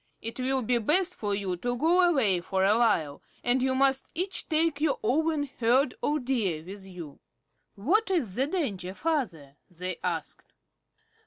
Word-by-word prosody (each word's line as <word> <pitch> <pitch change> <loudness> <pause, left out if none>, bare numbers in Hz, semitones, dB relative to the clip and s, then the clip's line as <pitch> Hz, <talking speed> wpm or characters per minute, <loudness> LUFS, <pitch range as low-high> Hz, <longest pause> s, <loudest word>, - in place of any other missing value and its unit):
It 230 +3 -5
will 260 0 +1
be 240 +2 +2
best 350 - +3
for 205 - -2
you 195 -3 -2
to 245 +6 -2
go 335 +7 +3
away 260 - +3
for 190 +2 0
a 205 +2 +4
while, 165 -11 +1 0.2
and 245 +1 +2
you 260 0 +1
must 270 0 +1
each 370 +4 -2
take 315 -2 +1
your 305 -3 +2
own 305 +6 +1 0.2
herd 250 +3 +3
of 295 -3 -1
Deer 200 -12 -1
with 195 +2 -9
you." 170 -6 -10 0.6
"What 380 - +1
is 305 - 0
the 265 +6 +1
danger, 205 - -3
Father?" 185 - -3
they 180 0 -5
asked. 170 -4 -4
245 Hz, 165 wpm, -28 LUFS, 190-300 Hz, 0.6 s, a